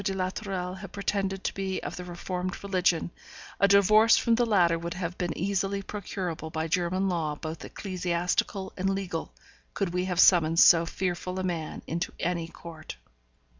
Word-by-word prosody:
de 195 0 -1
la 185 -1 -1
Tourelle 190 -2 -4
had 195 -1 -9
pretended 195 -1 -2
to - - -1
be 190 -1 -2
of - - -5
the 180 - -6
reformed 180 +1 -5
religion, 180 -4 +1 0.5
a 200 - +5
divorce 215 +3 +6
from 235 - +2
the 240 +1 +3
latter 175 -6 +3
would 170 +1 -5
have 175 -1 -4
been 175 -3 -2
easily 195 +2 0
procurable 180 -6 -5
by 160 0 -2
German 180 +3 0
law 165 -5 -1
both 155 +1 -6
ecclesiastical 180 +1 -2
and 190 +1 0
legal, 190 -4 -3 0.4
could 190 -4 -1
we 180 0 0
have 180 -2 -2
summoned 165 -3 +6
so 165 -1 +7
fearful 180 0 -3
a 185 - -2
man 170 -4 -3
into 170 +3 -3
any 170 -2 -1
court. 165 - -10
180 Hz, 170 wpm, -28 LUFS, 170-195 Hz, 0.5 s, so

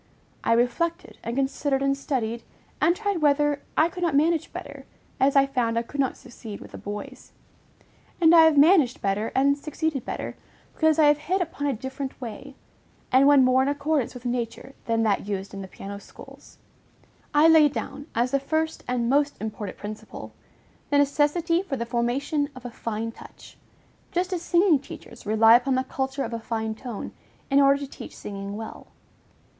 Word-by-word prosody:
I 230 - +3
reflected 245 +9 -1
and 230 +1 -4
considered 275 0 0
and 275 0 +2
studied, 235 -5 -2 0.4
and 345 - +4
tried 405 -4 -2
whether 290 0 +2 0.2
I 315 - +5
could 360 +1 -8
not 335 -5 +1
manage 320 +2 +2
better, 280 -1 -9 0.3
as 270 +2 +3
I 275 0 +6
found 245 -4 -1
I 230 - +1
could 285 +4 -9
not 270 -2 0
succeed 220 -4 -10
with - - -12
the - - -9
boys; 205 0 -8 0.9
and 330 -1 +6
I 325 -1 +8
have 320 -2 +4
managed 295 -4 +5
better 200 +3 0
and 280 +1 +4
succeeded 305 -2 -3
better, - - -5 0.4
because 315 -1 +2
I 315 - +5
have 295 0 +4
hit 365 +6 -1
upon 310 -5 -3
a 280 - +1
different 265 +3 -6
way, 260 +3 -8 0.6
and 265 +2 +6
one 285 -2 +7
more 255 +1 +4
in 265 - +1
accordance 285 -3 -1
with 250 0 -10
nature 245 +2 -3
than 230 -1 +1
that 205 -2 0
used 195 -1 -4
in 195 - -6
the 190 - -7
piano 200 +2 -8
schools. - - -15 0.7
I 300 +2 +5
laid 315 -3 +6
down, 285 0 -6
as 240 +2 +1
the 275 - +2
first 315 +3 -2
and 245 -1 0
most 285 +3 +1
important 210 -2 -5
principle, 210 +1 -8 0.6
the 290 - +3
necessity 295 +4 +2
for 335 -9 -4
"the 235 - -3
formation 265 +5 -1
of 255 -1 -12
a 245 - -5
fine 230 0 -4
touch," - - -14 0.6
just 365 +2 -1
as 350 - -2
singing 345 -3 +3
teachers 235 -4 -12
rely 225 +2 +6
upon 255 +2 +2
the 260 - +1
culture 265 +1 -3
of 230 - -5
a 230 - -3
fine 220 -1 -3
tone, 230 -1 -7 0.4
in 275 +1 +5
order 275 0 +5
to 280 0 -6
teach - - -10
singing 200 0 -6
well. 220 0 -8
275 Hz, 185 wpm, -25 LUFS, 230-295 Hz, 0.9 s, I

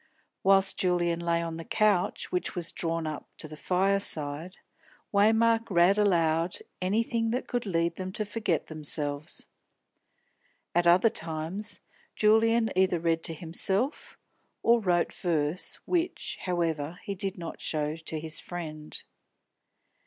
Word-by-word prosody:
Whilst 195 0 +4
Julian 175 -2 +1
lay 170 0 0
on 165 -1 -4
the 165 - -6
couch, 215 -4 +1
which 180 - -1
was 175 -2 -1
drawn 165 -1 -1
up 155 -1 -5
to 155 - -4
the 155 - -9
fireside, 180 -3 0 0.6
Waymark 225 +2 +4
read 185 +2 +4
aloud 170 -4 +2 0.2
anything 225 +4 +1
that 250 +3 -2
could 240 -3 -2
lead 170 -2 0
them 185 0 -4
to 215 +1 -2
forget 205 -6 -1
themselves. 150 -1 -4 1.3
At 175 0 +3
other 180 +6 +6
times, 165 +5 -4 0.3
Julian 225 +1 +4
either 185 -2 +3
read 165 0 +1
to 165 - -1
himself 190 - -1 0.5
or 235 +1 +5
wrote 175 -4 +1
verse, 160 -1 +1
which, 355 0 -1
however, 165 -3 -1
he 200 - -3
did 195 0 -2
not 170 -2 -7
show 150 -1 -1
to 160 -1 -4
his 155 0 -2
friend. 155 -3 -6
175 Hz, 130 wpm, -28 LUFS, 165-205 Hz, 1.3 s, other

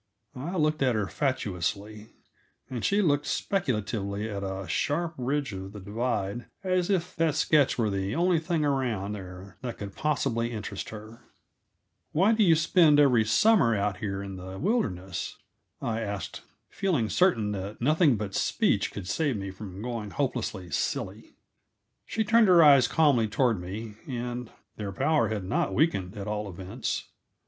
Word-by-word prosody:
I 150 +9 -5
looked 155 -1 +1
at 130 -3 +3
her 105 -2 0
fatuously, 105 - -2 0.6
and 120 -3 -4
she 205 +1 +2
looked 145 -4 +2
speculatively 105 - -1
at 100 -2 -4
a 95 -1 -4
sharp 165 - -1
ridge 135 -2 -1
of 95 +1 -7
the 105 - -8
divide 105 +1 -2 0.2
as 185 -1 +1
if 180 -2 0
that 165 -2 +2
sketch 150 -4 +3
were 110 -4 +1
the 95 +2 -2
only 175 -1 +3
thing 160 -2 0
around 120 -8 0
there 95 -1 -9
that 120 -2 -5
could 100 -1 -7
possibly 130 -6 0
interest 105 -3 -5
her. 110 +1 -10 0.9
"Why 190 +8 +4
do 220 -1 +3
you 170 -4 +6
spend 155 -1 +5
every 125 -6 +5
summer 120 - +4
out 100 -1 -1
here 100 -1 -3
in 95 -1 -7
the 95 +1 -8
wilderness?" 95 - -2 0.5
I 115 0 -1
asked, 100 -2 -5 0.3
feeling 170 - 0
certain 115 - +2
that 100 +1 -5
nothing 150 - +3
but 100 -2 -4
speech - - +1
could 95 -3 -7
save 145 - 0
me 100 -1 -5
from 95 0 -8
going 115 -4 -4
hopelessly 115 -8 -3
silly. - - -3 0.7
She 220 - 0
turned 225 0 +5
her 175 -3 +7
eyes 140 -5 +7
calmly 140 -8 +3
toward 115 -2 +1
me, 105 +4 -7
and 125 -1 -4 0.3
their 100 -2 -4
power 150 +3 +2
had 105 -3 -3
not 95 +1 -1
weakened, 105 - +1
at 100 0 -5
all 105 -1 -3
events. 95 +6 -4
115 Hz, 160 wpm, -28 LUFS, 100-150 Hz, 0.9 s, her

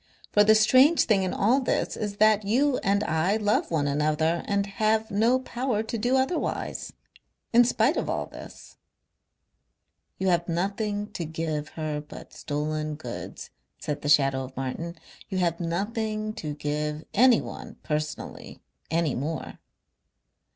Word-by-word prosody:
For 210 - +6
the 215 +1 +6
strange 260 +9 +6
thing 210 -4 +2
in 185 -1 -1
all 230 +7 +3
this 255 - -1
is 205 -1 -4
that 215 0 +4
you 255 +6 +2
and 200 0 +1
I 160 +6 +1
love 210 -1 +1
one 155 -4 0
another 155 +3 +1
and 200 -1 +1
have 215 +2 0
no 225 +5 +3
power 250 -3 -2
to 225 - -5
do 245 +4 +1
otherwise. 265 +6 -2 0.6
In 240 +1 +8
spite 245 +5 +2
of - - -1
all - - -1
this. - - -12 1.4
"You 190 0 0
have 175 0 +1
nothing 205 +4 -2
to 175 - -4
give 155 -1 -3
her 155 -2 -2
but 150 - -12
stolen 155 +1 -3
goods," 125 -5 -8 0.3
said 150 -1 -4
the 145 - -2
shadow 135 -2 +4
of 130 +1 -11
Martin. 150 +6 -4 0.3
"You 190 - -2
have 170 -2 0
nothing 215 +5 -2
to 155 -9 -5
give 150 +1 -3
anyone 245 +1 +2
personally 155 0 -4 0.3
any 165 -4 +1
more.... 155 +5 -4
190 Hz, 145 wpm, -26 LUFS, 155-220 Hz, 1.4 s, In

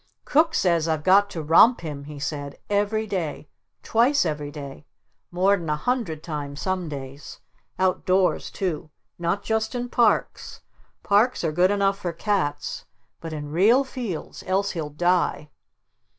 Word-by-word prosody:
"Cook 320 +3 +3
says 170 -3 +2
I've 160 -2 -1
got 200 +3 +5
to 165 -5 -5
romp 170 +10 +6
him!" 145 -4 -6
he 150 0 -9
said. 145 0 -5
"Every 205 +2 +1
day! 170 -7 -4 0.3
Twice 245 +2 +3
every 150 -2 -3
day! 145 -1 -9 0.4
More'n 180 -1 +1
a 150 - +2
hundred 165 -4 -2
times 145 -3 -5
some 185 -3 -2
days! 140 0 -8 0.4
Out 185 0 +1
doors 185 0 +2
too! 165 -5 -3 0.3
Not 170 +4 -1
just 220 +2 -1
in 245 0 -3
parks, 235 -4 0 0.4
parks 210 +4 +2
are 160 - 0
good 175 +4 +3
enough 195 -1 +1
for 175 -2 -3
cats, 165 -6 -2 0.3
but 165 - -7
in 150 -1 -6
real 215 - +4
fields! 245 - -6
Else 195 +2 +1
he'll 160 -4 -4
DIE!" 170 -1 0
175 Hz, 150 wpm, -24 LUFS, 150-205 Hz, 0.4 s, romp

